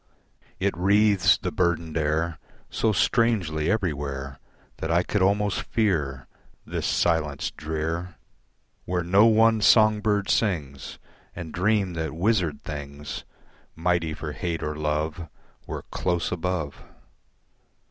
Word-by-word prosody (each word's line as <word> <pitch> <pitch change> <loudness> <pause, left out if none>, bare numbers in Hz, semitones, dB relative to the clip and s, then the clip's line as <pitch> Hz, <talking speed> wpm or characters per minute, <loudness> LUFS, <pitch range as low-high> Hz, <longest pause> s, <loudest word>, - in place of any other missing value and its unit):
It 100 -2 0
wreathes 100 0 +4
the 90 - -3
burdened 85 -3 0
air 80 +1 0 0.3
So 110 - +1
strangely 90 -7 +1
everywhere 70 -9 -2 0.4
That 80 - -4
I 85 +2 +3
could 105 +2 -1
almost 100 +2 +2
fear 75 - -1 0.4
This - - -3
silence 75 -4 0
drear 80 +3 -4 0.7
Where 90 -1 -1
no 100 +6 +5
one 110 0 +4
song 110 +1 +5
bird 105 -2 +1
sings 75 - -1 0.4
And 85 -3 -7
dream 100 0 +1
that 80 -2 -3
wizard 90 -3 0
things 70 0 -7 0.5
Mighty 85 -2 0
for 75 -1 -5
hate 85 +1 -3
or 75 0 -3
love 75 +2 -2 0.4
Were - - -5
close 90 -2 -1
above. 90 -4 -3
85 Hz, 115 wpm, -25 LUFS, 75-100 Hz, 0.7 s, no